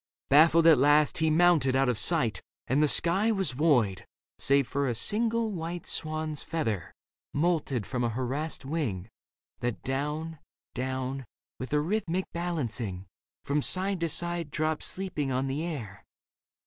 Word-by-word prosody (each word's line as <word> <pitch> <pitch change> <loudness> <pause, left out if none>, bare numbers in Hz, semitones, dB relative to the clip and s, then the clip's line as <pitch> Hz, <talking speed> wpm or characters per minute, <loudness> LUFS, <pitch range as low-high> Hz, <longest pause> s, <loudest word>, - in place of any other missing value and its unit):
Baffled 160 +3 +6
at 160 -5 +7
last, 145 +3 +4
he 160 0 +2
mounted 155 -5 +4
out 135 0 +3
of 120 -5 0
sight 125 -5 +1 0.2
And 140 +3 +1
the 150 - +4
sky 190 +9 +2
was 195 -7 0
void 125 - +1 0.2
— - - -59
save 140 -1 +2
for 140 0 -1
a 120 - -1
single 225 - 0
white 170 -2 -5
Swan's 155 -1 -2
feather 110 - -3 0.4
moulted 145 - 0
from 125 -2 -2
a 120 - +1
harassed 130 +5 -3
wing 125 - -3 0.5
That 120 -2 -3
down, 150 +4 -3 0.3
down, 130 0 -3 0.3
with 130 - -6
a 150 - +3
rhythmic 185 +1 -1
balancing 120 - -3 0.4
From 145 +1 0
side 190 +4 0
to 165 0 -1
side 170 0 -1
dropped 155 +1 -1
sleeping 170 -8 -2
on 130 +1 0
the 135 +3 -2
air. 125 -12 -6
150 Hz, 150 wpm, -28 LUFS, 130-165 Hz, 0.5 s, at